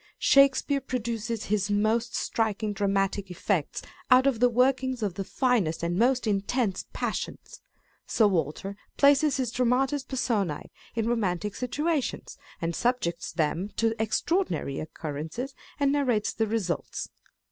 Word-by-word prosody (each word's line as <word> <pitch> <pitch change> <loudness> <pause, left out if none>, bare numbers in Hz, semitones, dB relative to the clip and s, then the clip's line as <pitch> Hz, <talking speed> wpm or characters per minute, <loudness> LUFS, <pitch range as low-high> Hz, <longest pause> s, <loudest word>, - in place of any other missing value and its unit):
Shakespeare 275 0 +4
produces 230 -3 -3
his 205 -1 0
most 220 +3 +1
striking 215 -1 -1
dramatic 195 -1 0
effects 180 -2 -1 0.3
out 255 +1 +6
of 270 -5 +2
the 245 +1 +5
workings 255 0 +1
of 200 -4 -1
the 195 - -4
finest 205 - 0
and 170 +1 0
most 245 +5 +2
intense 205 0 0
passions; - - -4 0.5
Sir 225 - +3
Walter 190 +1 -1 0.2
places 285 +1 +5
his 255 -4 -1
dramatis 255 +3 +1
personce 215 - -2 0.2
in 225 -1 0
romantic 210 -4 0
situations, 295 +3 -2 0.2
and 165 0 -2
subjects 175 -9 -1
them 165 +4 -1
to 225 -1 +2
extraordinary 220 - 0
occurrences, 160 - -5 0.3
and 280 -1 +3
narrates 250 -7 +1
the 225 -1 0
results. 205 -7 -2
225 Hz, 125 wpm, -27 LUFS, 195-255 Hz, 0.5 s, out